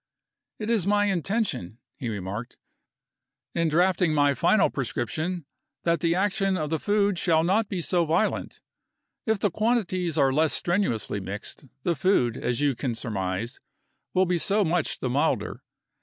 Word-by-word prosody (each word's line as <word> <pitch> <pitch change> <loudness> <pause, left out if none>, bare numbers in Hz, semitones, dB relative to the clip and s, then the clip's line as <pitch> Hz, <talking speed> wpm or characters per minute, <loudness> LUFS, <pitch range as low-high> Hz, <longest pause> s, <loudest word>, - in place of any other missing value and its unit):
"It 215 +1 -2
is 205 -6 +2
my 205 0 +3
intention," 195 - -1 0.2
he 120 - -4
remarked, 105 +3 -5 1.0
"in 165 -1 +1
drafting 175 0 +2
my 145 -1 +4
final 175 +8 +3
prescription, 155 +6 -3 0.4
that 170 -1 +2
the 165 +2 +1
action 195 0 +1
of 155 -2 -3
the 160 - 0
food 205 -1 +1
shall 160 -1 +3
not 200 +5 +2
be 185 -3 -2
so 175 0 +2
violent. 170 +7 0 0.7
If 220 -1 +2
the 200 0 0
quantities 185 -6 0
are 135 -2 +4
less 155 +2 +3
strenuously 170 - 0
mixed, 100 +8 -6 0.2
the 170 - +1
food, 140 - +2
as 125 +2 -2
you 145 -2 +3
can 120 -1 -3
surmise, 105 0 -3 0.6
will 185 +1 +4
be 175 -1 +1
so 205 +5 +2
much 170 -1 0
the 130 - -1
milder. 140 +3 0
170 Hz, 155 wpm, -26 LUFS, 135-195 Hz, 1.0 s, my